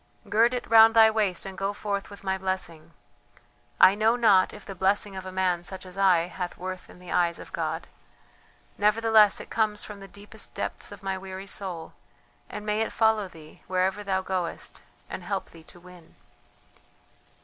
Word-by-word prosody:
Gird 230 +4 +3
it 245 - -4
round 225 0 +7
thy 220 -1 +7
waist 205 -5 -1
and 195 -1 -7
go 195 +1 -2
forth 200 -1 -3
with 200 -1 -12
my 190 -1 0
blessing. 185 -4 -4 0.9
I 190 - +8
know 220 +3 +2
not 210 -6 +4
if 210 - -12
the 195 - -7
blessing 195 +2 0
of 190 0 -6
a - - -6
man 185 -2 0
such 190 +1 -7
as 185 0 -12
I 190 -3 +4
hath 180 +1 -5
worth 185 0 -6
in - - -14
the 180 0 -11
eyes 170 -1 +2
of - - -12
God; - - -3 0.9
nevertheless 215 0 +4
it - - -10
comes 215 -2 0
from 210 -1 -9
the 195 - -10
deepest 200 +1 -9
depths - - -5
of - - -11
my 190 -1 -2
weary 190 0 -8
soul, 185 -5 -6 0.6
and 210 0 -7
may 210 +1 0
it 225 - -1
follow 220 -2 +2
thee 155 -3 -15
wherever 185 +2 0
thou 190 -1 -1
goest 185 -3 -4 0.3
and - - -6
help - - -4
thee 165 - -14
to 175 - -16
win." 180 -2 -16
195 Hz, 185 wpm, -26 LUFS, 185-210 Hz, 0.9 s, I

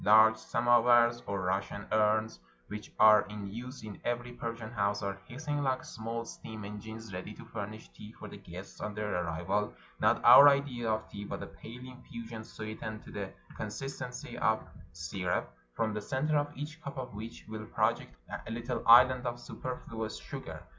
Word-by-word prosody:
Large 110 +1 +7
samovars, 120 +1 +4
or 100 -1 -1
Russian 95 +2 -1
urns, 110 - +2 0.3
which 105 0 -7
are 105 -1 +9
in 105 -1 -6
use 120 +6 -7
in 105 -2 -8
every 120 0 -2
Persian 115 -2 -5
house, 100 -2 0
are 100 0 -3
hissing 145 +4 -3
Hke 130 -3 0
small 115 +1 -4
steam 110 -2 -8
engines, 110 +1 -8
ready 95 +3 -6
to - - -11
furnish 110 0 -6
tea 105 - -11
for - - -9
the - - -9
guests 90 +3 -10
on 105 -1 -4
their 105 -1 -2
arrival: 85 +5 -1 0.3
not - - +4
our 145 - +11
idea 135 -5 0
of 110 0 0
tea, 100 - -7
but - - -5
a - - -4
pale 120 +2 -10
infusion 115 -3 -8
sweetened 110 0 -6
to - - -11
the 100 -2 -4 0.3
con - - -3
sistency - - -6
of - - +2 0.3
syrup, 85 -5 -2 0.2
from 110 -1 0
the 105 - -2
center 135 +8 0
of 145 0 +1
each 155 +3 -6
cup 140 - -7
of 125 -3 -5
which 110 +3 -8
will 110 0 -6
project - - 0 0.3
a - - -5
little 120 +1 -2
island 125 +2 +8
of 120 0 -3
superfluous 115 - -5
sugar. - - -7
110 Hz, 175 wpm, -32 LUFS, 105-120 Hz, 0.3 s, our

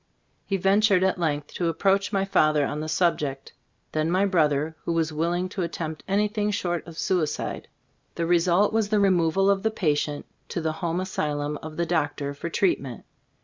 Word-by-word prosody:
He 195 - 0
ventured 195 0 +3
at 190 -1 +1
length 150 -3 -2
to 175 - -1
approach 195 +4 +1
my 195 -2 +1
father 155 -6 +3
on 150 - -3
the 155 +1 -4
subject; 150 -6 0 0.4
then 155 +1 0
my 185 +3 +2
brother, 155 -4 +1
who 170 - -1
was 160 -1 0
willing 170 +4 0
to 190 - -4
attempt 160 -2 -4
anything 210 +1 +1
short 175 -5 -2
of 165 -1 -10
suicide. 165 -5 -1 0.5
The 170 - -1
result 175 +4 +3
was 220 -2 +1
the 210 -1 +2
removal 190 -1 +3
of 200 -1 +3
the 220 - +1
patient 150 -7 -1 0.2
to - - -3
the 160 -1 -1
home 170 0 -1
asylum 150 -5 -2
of 155 0 -8
the 170 - +1
doctor 145 -4 -1
for 155 +4 -5
treat 185 +2 +1
ment. 130 -5 -8
170 Hz, 185 wpm, -25 LUFS, 155-195 Hz, 0.5 s, ventured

